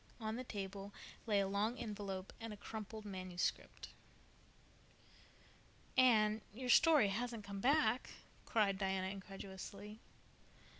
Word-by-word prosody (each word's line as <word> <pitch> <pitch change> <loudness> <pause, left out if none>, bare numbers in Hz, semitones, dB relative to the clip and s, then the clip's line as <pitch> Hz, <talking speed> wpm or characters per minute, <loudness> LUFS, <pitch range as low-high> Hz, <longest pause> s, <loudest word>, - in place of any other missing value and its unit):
On 220 -1 -2
the 255 - -3
table 200 -3 -5 0.4
lay 205 -2 +4
a 195 - +1
long 210 +5 0
envelope 200 -4 -5
and 225 -1 -5
a 210 - -7
crumpled 215 +1 -7
manuscript. 185 -3 -3 2.1
"Anne, 220 -4 +5
your 250 +4 -5
story 295 -5 +7
hasn't 230 +2 -2
come 200 0 -5
back?" 250 -1 +3 0.3
cried 200 -4 +2
Diana 190 -1 0
incredulously. 195 +2 -8
210 Hz, 110 wpm, -38 LUFS, 195-225 Hz, 2.1 s, story